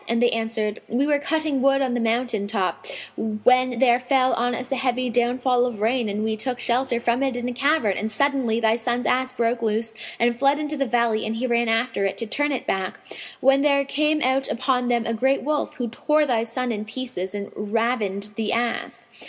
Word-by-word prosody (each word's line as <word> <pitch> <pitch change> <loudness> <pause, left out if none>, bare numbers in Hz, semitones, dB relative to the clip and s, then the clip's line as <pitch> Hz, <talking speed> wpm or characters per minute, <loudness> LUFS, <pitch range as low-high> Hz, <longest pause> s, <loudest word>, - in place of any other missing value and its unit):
and 230 0 +1
they 240 0 +3
answered, 225 -1 -2
"We 255 +4 +1
were 290 -1 +2
cutting 310 -2 0
wood 275 +1 +4
on 260 -2 0
the 245 - 0
mountain 230 -2 0
top, 205 - -2 0.3
when 250 +3 +2
there 245 -1 +4
fell 255 0 +2
on 245 +1 0
us 255 +3 -6
a - - +1
heavy 255 -1 -1
downfall 245 +1 +2
of 235 -4 -6
rain 230 +1 +1
and 205 +1 -2
we 220 0 0
took 250 +3 -3
shelter 245 0 0
from 240 +2 0
it 270 -2 0
in 245 0 -3
a 250 - -3
cavern; 245 -5 +1
and 215 - -2
suddenly 260 -2 +1
thy 225 0 +2
son's 240 +1 -1
ass 255 0 +1
broke 235 -1 -1
loose 225 0 -1 0.3
and 235 0 +2
fled 275 +3 +3
into 300 0 -3
the 275 -2 -1
valley, 235 -2 +1
and 220 - -2
he 240 +3 -2
ran 235 -1 +1
after 225 -2 0
it, 195 - -1
to 230 - -3
turn 290 +6 -1
it 265 - -2
back, 190 -1 -2 0.4
when 270 +1 +4
there 280 -1 +3
came 305 +2 +1
out 265 +1 +1
upon 250 0 0
them 240 -2 +1
a 230 - -1
great 265 +5 +1
wolf, 300 +2 -1
who 245 - -3
tore 300 +6 +1
thy 235 -5 +1
son 245 +2 -3
in 210 -2 -3
pieces 215 -5 -5
and 200 0 -5
ravined 210 -2 -1
the 220 -2 -1
ass." 235 0 -2
245 Hz, 220 wpm, -23 LUFS, 225-265 Hz, 0.4 s, wood